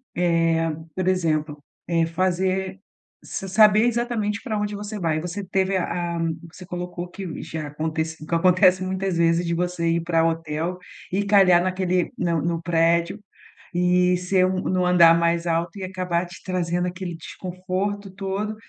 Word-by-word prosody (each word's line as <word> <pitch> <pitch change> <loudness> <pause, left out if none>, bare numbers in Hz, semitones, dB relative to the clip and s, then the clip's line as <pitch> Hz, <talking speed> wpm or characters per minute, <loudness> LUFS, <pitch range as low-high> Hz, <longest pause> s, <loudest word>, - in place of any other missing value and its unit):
Eh, 165 -2 +2 0.2
por 185 -1 -2
exemplo, 155 -5 0 0.2
é 165 -1 +1
fazer 185 +2 -1 0.4
s 195 - -5
saber 210 +2 +5
exatamente 235 -3 -1
pra 225 -5 -3
onde 210 0 -2
você 210 +1 -6
vai. 155 -2 0
Você 180 +3 -5
teve 190 +1 0
a 175 -1 -2
a - - -3
que 165 -1 0 0.2
você 180 - -10
colocou 180 0 -5
que 180 -2 -7
já 160 -2 -5
acontece 160 +1 -3
o - - -7
que 170 - -6
acontece 185 +1 +4
muitas 190 -1 -2
vezes 170 +1 +2
de 170 - -1
você 175 -1 -1
ir 170 0 +1
pra 165 -1 +2
o - - +4
hotel 165 +2 -3 0.3
e 195 +2 +1
calhar 195 -4 +5
naquele 185 -1 0
na 170 -3 0
no 165 +1 -1
prédio 170 +3 +2 0.6
e 180 0 +3
ser 185 +1 +2
um 185 0 -1
no 185 -1 0
andar 170 -2 +6
mais 170 0 +1
alto 170 +3 -1
e 190 - -5
acabar 180 -2 -2
te 175 -1 -13
trazendo 180 -1 -1
aquele 180 -1 -5
desconforto 185 +4 -4
todo. 195 +2 -3
180 Hz, 170 wpm, -23 LUFS, 170-190 Hz, 0.6 s, andar